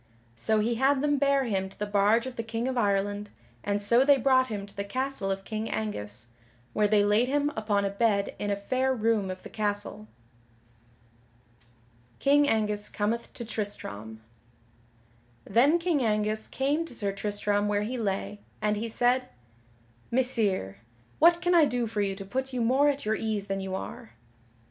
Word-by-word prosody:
So 215 - +1
he 235 +3 +1
had 270 0 +3
them 290 -1 +2
bare 280 -1 +3
him 195 -5 -1
to 195 - -18
the 210 - -2
barge 205 +3 +3
of 260 -1 -6
the - - -2
King 225 +2 -3
of 260 - -2
Ireland, 205 -2 0 0.3
and 205 0 0
so 235 +5 +4
they 285 0 +5
brought 260 0 +3
him 205 -4 -4
to 200 - -13
the 200 - -3
castle 255 -1 -2
of 195 0 -2
King 220 +1 -4
Angus, 115 - -4 0.5
where 210 0 +3
they 205 -1 +3
laid 210 +4 +3
him 290 +2 +1
upon 210 -2 0
a 195 - -1
bed 200 -1 +1
in 205 - -2
a 200 - +1
fair 260 +6 0
room 220 -4 +1
of 185 0 -6
the - - -9
castle. 205 - -3 2.1
[Sidenote: - - -34
King 285 +1 +4
Angus 210 -1 0
cometh 225 +3 -2
to 235 - -7
Tristram] 110 - -5 1.2
Then 260 +11 +4
King 335 -4 0
Angus 215 -1 0
came 285 +5 0
to 285 - -8
Sir 200 -3 0
Tristram 205 0 -1
where 205 0 +1
he 245 +4 -3
lay, 205 -1 -2 0.2
and 210 -1 0
he 230 +2 -3
said: 250 +3 +1 0.8
"Messire 220 - +1 0.4
what 340 +2 +5
can 355 0 +2
I 335 -3 +6
do 245 -3 -1
for 215 -2 -2
you 195 -1 -1
to 195 0 -8
put 265 +6 -3
you 250 - -1
more 265 +5 +4
at 285 -3 -2
your 215 - +1
ease 215 -2 -2
than 195 -1 -3
you 190 0 -4
are?" 225 +4 -7
215 Hz, 180 wpm, -28 LUFS, 205-255 Hz, 2.1 s, I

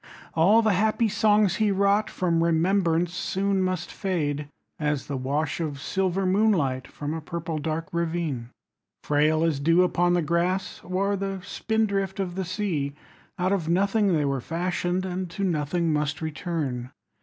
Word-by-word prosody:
All 200 +8 +5
the 215 -2 +3
happy 220 +4 +2
songs 210 -1 +3
he 215 -1 +2
wrought 200 +2 +2
From 170 -2 +1
remembrance 170 0 +2
soon 195 +1 0
must 185 -2 -2
fade, 150 -7 -2 0.3
As 150 -2 -1
the 140 - -4
wash 140 +5 -1
of 150 -4 -3
silver 190 +4 0
moonlight 180 - +2
15 - - -22
From 145 +1 -3
a 160 - -4
purple 165 -1 -4
dark 160 +2 -2
ravine. 165 -8 -2 0.5
Frail 155 +2 +2
as 160 -4 +1
dew 165 +5 +4
upon 175 0 +2
the 175 - +1
grass 175 +4 -1
Or 195 +2 0
the 195 0 -3
spindrift 200 -3 -1
of 185 -3 -2
the 190 +1 -3
sea, 165 -8 -2 0.4
Out 180 +1 +1
of 175 -5 0
nothing 200 +2 +2
they 150 -3 +2
were 135 -2 -1
fashioned 175 +3 -1
And 185 0 -3
to 195 +4 -4
nothing 165 -1 0
must 150 0 -1
return. 155 -6 -3
175 Hz, 160 wpm, -26 LUFS, 155-195 Hz, 0.5 s, All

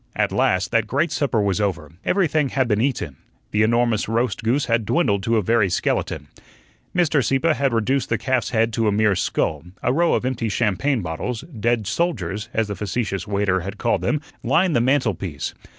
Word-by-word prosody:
At - - +1
last 90 -1 +1
that 115 -2 +2
great 145 +7 0
supper 135 -6 0
was 100 -1 +1
over, 85 -7 -2
everything 155 -7 +1
had 130 -1 0
been 105 -1 +1
eaten; 115 - -2 0.3
the 105 - +2
enormous 115 -1 +2
roast 115 -2 0
goose 125 +5 +1
had 115 -1 +1
dwindled 105 - +1
to 115 +2 +1
a 105 - +1
very 110 -1 +2
skeleton. 90 - -1 0.7
Mr. 160 -6 +3
Sieppe 135 +7 +2
had 140 -3 0
reduced 120 +4 0
the 115 - +1
calf's 125 0 0
head 115 -1 +1
to 115 -1 +1
a - - +3
mere 105 -1 +2
skull; 80 -3 -1 0.2
a 125 - +2
row 170 +3 +3
of - - -1
empty 125 -3 -1
champagne 115 +3 0
bottles 100 +9 -4
"dead 120 -7 -1
soldiers," 105 - -2
as 110 -1 0
the 100 - -4
facetious 100 -2 -3
waiter 100 -2 +1
had 100 +3 -6
called 120 - 0
them 150 - 0 0.2
lined 165 +7 +2
the 120 - +3
mantelpiece. 105 - 0
115 Hz, 190 wpm, -22 LUFS, 100-130 Hz, 0.7 s, Mr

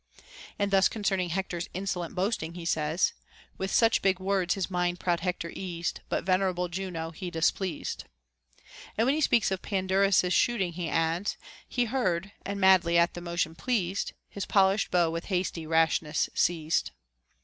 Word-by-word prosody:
|| - - -16
knd 200 -1 0
thus 195 -1 +5
concerning 195 -4 -1
Hecter's 175 -1 -3
insolent 185 -3 -3
boasting 185 -4 -1
he 175 -2 -7
says, 160 +2 +1 0.2
— - - -26
With 190 - -2
such 225 +3 +3
big 190 -1 +2
words 190 -2 +1
his 195 -3 -2
mind 180 -1 -1
proud 175 -2 0
Hector 175 -1 -3
eased, 170 -4 -4
But - - -1
venerable 185 -1 +1
Juno 175 -3 -4
he 180 +2 -6
displeased. 175 +1 -1
Τ - - -9 0.9
And 225 - +3
when 265 - +3
he 310 - 0
speaks 235 -8 +3
of 190 - -2
Pandarus's 190 -1 +2
shooting, 195 -8 +2
he 170 -1 -3
adds, 165 +5 0 0.2
— - - -23
He 245 - +4
heard, 200 -6 -1
and 200 0 -4
madly 185 -3 +5
at 170 0 +3
the 175 - -7
motion 170 -2 -1
pleased, 200 -2 -1
His 200 - -6
polish'd 195 0 +3
bow 170 -2 +2
with 165 +1 -4
hasty 180 -4 -2
rashness 160 -1 +2
seized. 160 -2 +1
180 Hz, 170 wpm, -28 LUFS, 170-195 Hz, 0.9 s, thus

